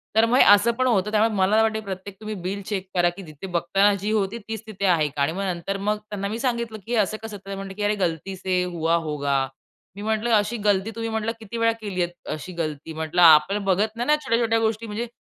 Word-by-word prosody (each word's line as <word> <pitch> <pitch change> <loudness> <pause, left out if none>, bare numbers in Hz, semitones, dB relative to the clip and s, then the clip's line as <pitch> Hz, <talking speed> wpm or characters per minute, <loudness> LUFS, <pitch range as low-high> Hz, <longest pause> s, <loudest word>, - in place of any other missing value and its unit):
तर 220 +1 +6
मग 245 +3 +2
हे - - +8
असं 210 +4 +2
पण 255 - +3
होतं. 210 -3 +1
त्यामुळे 220 +1 +3
मला 200 +3 +3
वाटते 220 -1 +1
की 215 - -11
प्रत्येक 190 +1 -6
तुम्ही 215 0 -5
बिल 195 +3 -3
चेक 195 -2 -3
करा 175 -1 +4
की 190 +3 -10
तिथे 155 +5 -9
बघताना 185 +4 +2
जी 210 +2 -1
होती 210 +1 0
तीच 220 -1 -5
तिथे 200 -2 -4
आहे 165 -5 +3
का? 140 0 -5
आणि 140 +3 +2
मग 195 +3 -3
नंतर 185 +1 -2
मग 210 0 +2
त्यांना 200 -1 -3
मी 220 +3 -4
सांगितलं 235 -3 -2
की 235 - -8
हे - - +2
असं 215 +2 0
कसं? 215 -2 -6
तर 195 0 -14
ते 195 - -3
म्हणले 195 0 -7
की 210 - -4
"अरे 205 +1 +2
गलती 185 0 -2
से 185 -1 0
हुआ 170 -2 0
होगा." 145 -2 0 0.6
मी 200 - -8
म्हटलं, 220 +2 -1
"अशी 210 +3 +1
गलती 205 +1 +2
तुम्ही" 230 0 -3
म्हटलं, 220 0 -1
"किती 225 +1 -7
वेळा 230 0 +3
केलीयेत? 185 -4 -2 0.2
अशी 165 +4 -5
गलती?" 160 -1 -4
म्हटलं 160 +3 -1
आपण 170 +5 +6
बघत 205 +3 +1
नाही 240 +1 -3
ना 300 - +5
छोट्या-छोट्या 230 -1 +2
गोष्टी 225 0 -1
म्हणजे 220 +3 -4
200 Hz, 250 wpm, -24 LUFS, 180-220 Hz, 0.6 s, हे